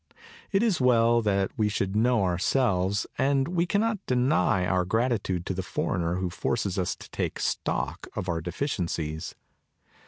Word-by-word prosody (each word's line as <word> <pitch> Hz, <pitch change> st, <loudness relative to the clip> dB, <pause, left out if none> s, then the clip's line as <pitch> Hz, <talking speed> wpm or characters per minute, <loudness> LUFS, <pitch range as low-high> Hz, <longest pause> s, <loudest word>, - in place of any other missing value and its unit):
It 195 Hz, +1 st, +3 dB
is 205 Hz, -, +1 dB
well 120 Hz, -2 st, +4 dB
that 100 Hz, -3 st, +1 dB
we 105 Hz, -1 st, +3 dB
should 100 Hz, -1 st, -2 dB
know 115 Hz, 0 st, +3 dB
ourselves; 95 Hz, +1 st, +1 dB
and 135 Hz, 0 st, +2 dB
we 175 Hz, 0 st, 0 dB
cannot 210 Hz, +1 st, 0 dB
deny 125 Hz, -7 st, +2 dB
our 90 Hz, 0 st, +1 dB
gratitude 100 Hz, -3 st, 0 dB
to -, -, -2 dB
the 95 Hz, -, -2 dB
foreigner 90 Hz, -2 st, -1 dB
who 90 Hz, -1 st, -2 dB
forces 100 Hz, -1 st, -1 dB
us 90 Hz, -, -1 dB
to -, -, -13 dB
take -, -, -3 dB
stock -, -, -2 dB
of -, -, -3 dB
our 85 Hz, -2 st, -1 dB
deficiencies. 85 Hz, -, -3 dB
105 Hz, 155 wpm, -27 LUFS, 90-130 Hz, -, well